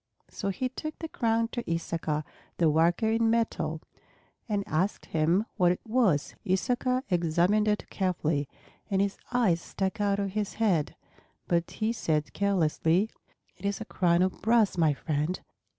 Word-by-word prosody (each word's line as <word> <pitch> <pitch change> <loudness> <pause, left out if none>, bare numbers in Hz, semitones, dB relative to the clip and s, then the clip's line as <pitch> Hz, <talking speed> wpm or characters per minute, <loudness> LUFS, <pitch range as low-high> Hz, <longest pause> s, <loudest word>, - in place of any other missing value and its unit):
So 200 - -3
he 255 +7 -1
took 310 +5 -6
the 325 - -5
crown 230 -5 0
to 240 0 -4
Issachar, 165 -2 -1 0.3
the 165 -3 +4
worker 170 +8 +3
in 225 0 +2
metal, 225 -8 0 0.7
and 205 -2 0
asked 180 +6 -1
him 165 +6 +2
what 180 -3 +4
it 180 - -3
was. 215 - +2
Issachar 250 +6 0
examined 175 +5 +2
it 210 0 0
carefully, 160 -7 0 0.4
and 195 -2 +1
his 200 0 0
eyes 210 -9 +2
stuck 190 +4 -3
out 200 -1 +2
of 200 -1 -2
his 210 0 -2
head. 190 -9 +1 0.5
But 170 -1 +1
he 220 +1 -1
said 155 -8 -1
carelessly, 185 0 +1 0.5
"It 180 - -18
is 200 0 -1
a 220 - -5
crown 175 -3 +2
of 185 - -2
brass, 225 -1 +3
my 160 -4 +3
friend. 155 +5 -1
190 Hz, 155 wpm, -28 LUFS, 165-220 Hz, 0.7 s, the